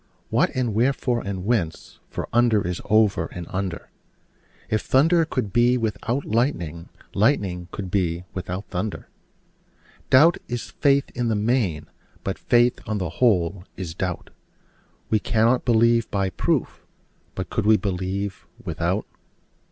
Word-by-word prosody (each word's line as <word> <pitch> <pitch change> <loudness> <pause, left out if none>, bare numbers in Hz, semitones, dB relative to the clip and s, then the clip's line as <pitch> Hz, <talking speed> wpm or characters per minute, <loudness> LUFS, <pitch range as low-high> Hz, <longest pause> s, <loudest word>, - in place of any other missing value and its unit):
What, - - +3
and 125 -4 0
wherefore, 120 +1 +1
and 95 -2 -4
whence? 100 -9 -2
for - - -4
under 115 -5 +3
is 90 -1 -3
over 110 -2 +3
and 90 -1 -7
under: 95 -3 -4 0.8
If 110 -1 0
thunder 165 +5 +3
could 125 -10 -3
be 120 +1 +4
without 115 +3 -2
lightning, 85 - -1 0.2
lightning 95 -6 +1
could 95 -1 -6
be 90 -3 0
without 95 +1 -4
thunder. 100 +3 -4 1.0
Doubt 160 +6 +6
is 120 0 -5
faith 140 -1 +2
in 120 -1 -1
the 110 - +1
main: 105 - 0 0.4
but 95 - -3
faith, 120 0 +3
on 110 - -1
the 90 -4 -2
whole, 95 -6 +2
is 90 -3 -5
doubt: 90 +1 -4 0.8
We 110 - +4
cannot 115 +3 +2
believe 115 -1 +3
by 95 -2 0
proof: - - -1 0.5
but 95 -2 -5
could 105 -2 0
we 110 0 +6
believe 95 0 -3 0.2
without? - - -1
105 Hz, 135 wpm, -24 LUFS, 95-120 Hz, 1.0 s, Doubt